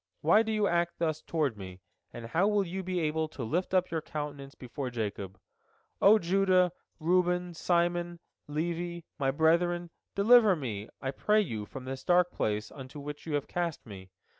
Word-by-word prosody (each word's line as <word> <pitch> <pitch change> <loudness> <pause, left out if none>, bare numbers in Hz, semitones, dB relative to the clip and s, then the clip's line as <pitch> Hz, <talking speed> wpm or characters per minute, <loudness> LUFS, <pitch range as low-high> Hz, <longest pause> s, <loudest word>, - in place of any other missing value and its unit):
Why 170 +8 +5
do 220 -1 -2
you 215 -1 +1
act 170 -2 0
thus 155 -2 -1
toward 150 -8 -1
me? 95 -2 -9 0.3
And 115 - -8
how 165 - +2
will 205 -2 +2
you 185 +2 -4
be 185 -1 -2
able 155 0 0
to 145 -5 -7
lift 170 +11 -1
up 185 -1 +2
your 160 -1 -1
countenance 145 -3 -6
before 125 +1 -5
Jacob? 100 -5 -5 0.6
O 210 +2 +7
Judah, 185 -1 +3 0.3
Reuben, 180 +1 +1
Simon, 175 0 0 0.3
Levi, 170 +3 -3
my 135 -1 +1
brethren, 170 +4 +2 0.2
deliver 215 -1 +6
me, 115 -8 -5
I 135 - -1
pray 210 +8 +2
you, 110 - -4
from 130 +3 -9
the 130 0 -5
dark 180 0 +4
place 105 0 -2
into 135 +1 -9
which 145 +2 -8
you 150 - -1
have 145 - -2
cast 170 -3 -3
me. 95 -4 -10
165 Hz, 175 wpm, -30 LUFS, 135-180 Hz, 0.6 s, O